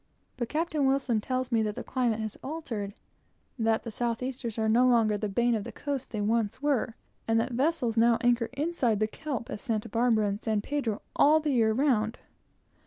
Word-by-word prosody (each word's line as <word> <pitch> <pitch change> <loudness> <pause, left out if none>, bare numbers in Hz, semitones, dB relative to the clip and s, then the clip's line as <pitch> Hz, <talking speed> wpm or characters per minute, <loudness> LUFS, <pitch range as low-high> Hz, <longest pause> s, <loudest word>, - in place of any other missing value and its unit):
But 240 -2 -3
Captain 310 -3 0
Wilson 265 -5 +1
tells 255 +2 -2
me 230 -1 +3
that 210 -1 -1
the - - -5
climate 240 -4 0
has 215 -1 -4
altered; 235 -10 -5 0.6
that 225 0 +1
the 230 - -6
southeasters 240 +1 -3
are 220 0 +1
no 240 +3 +4
longer 225 -4 +4
the 205 0 -2
bane 240 +4 +2
of 215 -3 -1
the - - -7
coast 285 -3 -4
they 215 - -3
once 215 0 0
were, 270 -5 0 0.3
and 225 0 +3
that 230 - -1
vessels 250 -3 0
now 230 0 +5
anchor 240 -1 +2
inside 275 -7 0
the 215 - +3
kelp 255 +2 -5
at - - -4
Santa 220 -4 -2
Barbara 225 -1 +2
and 200 +2 -3
San 215 -2 0
Pedro 240 -4 -2
all 305 +2 +5
the 305 -1 -1
year 225 -3 +3
round. 230 -3 +1
235 Hz, 195 wpm, -28 LUFS, 220-265 Hz, 0.6 s, now